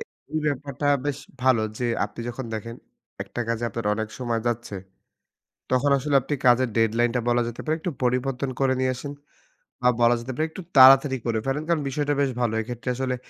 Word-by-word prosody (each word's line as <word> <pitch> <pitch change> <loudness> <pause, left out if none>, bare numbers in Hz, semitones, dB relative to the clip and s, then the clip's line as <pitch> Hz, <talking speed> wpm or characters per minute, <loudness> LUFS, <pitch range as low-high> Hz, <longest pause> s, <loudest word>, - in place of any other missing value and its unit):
এ - - -3 0.4
ব্যাপারটা 145 0 -2 0.2
বেশ 145 -1 -2 0.2
ভালো। 130 -4 +4 0.2
যে 125 - -2 0.2
আপনি - - -8
যখন 125 +2 -5
দেখেন 115 +2 -6 0.5
একটা - - -7
কাজে 115 0 -1
আপনার 115 0 -4
অনেক 110 0 -3
সময় 120 -3 -1
যাচ্ছে। 120 -3 -2 0.9
তখন 130 +3 +2
আসলে 145 +2 -2
আপনি 145 +3 -3
কাজের 125 +1 +5
ডেডলাইনটা 115 +2 +2
বলা 120 0 +3
যেতে 120 - -7
পারে 155 - +1
একটু 175 - -2
পরিবর্তন 125 +2 0
করে 135 -1 +3
নিয়ে 130 0 +1
আসেন 145 +3 -6 0.7
বা 125 - +3
বলা 120 +1 +5
যেতে 120 +3 -6
পারে 155 - 0
একটু 175 - -9 0.2
তাড়াতাড়ি 135 +1 +8
করে 115 -2 0
ফেলেন। 135 +3 -1
কারণ 165 -3 +1
বিষয়টা 145 +2 -1
বেশ 140 - +2
ভালো। 120 -2 +1
এক্ষেত্রে 120 +2 -5
আসলে 130 0 -1
125 Hz, 185 wpm, -24 LUFS, 120-135 Hz, 0.9 s, তাড়াতাড়ি